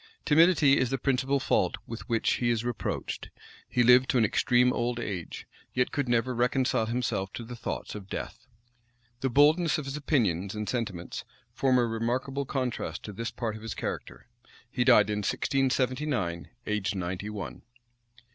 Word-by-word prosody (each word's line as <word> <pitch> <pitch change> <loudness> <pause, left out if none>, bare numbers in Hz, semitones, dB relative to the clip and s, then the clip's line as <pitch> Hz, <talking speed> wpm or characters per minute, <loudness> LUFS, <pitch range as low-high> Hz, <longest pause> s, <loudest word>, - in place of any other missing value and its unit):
Timidity 155 -3 +5
is 125 - +1
the 135 - 0
principal 135 +1 +1
fault 90 -8 +1
with 115 0 -8
which 115 -1 +2
he 120 - 0
is 115 0 0
reproached; 120 -2 -3 0.4
he 125 - +2
lived 125 +2 +6
to 130 - +2
an 115 - +4
extreme 125 +4 +3
old 120 0 -1
age, 95 -7 -5 0.3
yet 125 0 +1
could 140 -4 -1
never 120 +2 +1
reconcile 125 -1 +1
himself 115 -5 -1
to 120 - -6
the 120 +2 -8
thoughts 120 - -5
of 100 -2 -9
death. - - -6 0.7
The 135 - 0
boldness 150 +5 +4
of 155 - -4
his 135 +1 -4
opinions 105 - 0
and 105 0 -4
sentiments 105 -7 -3 0.3
form 130 -2 +2
a 120 - +3
remarkable 125 +5 -2
contrast 130 -3 -3
to 105 - -7
this 115 +4 -3
part 115 -3 -4
of 110 - -9
his 115 0 -5
character. - - -5 0.5
He 125 - +1
died 110 -5 +5
in 105 - -1
1679, 130 - 0 0.2
aged 105 -2 -1
ninety 95 +2 -3
one. 95 - -6
120 Hz, 165 wpm, -28 LUFS, 105-130 Hz, 0.7 s, lived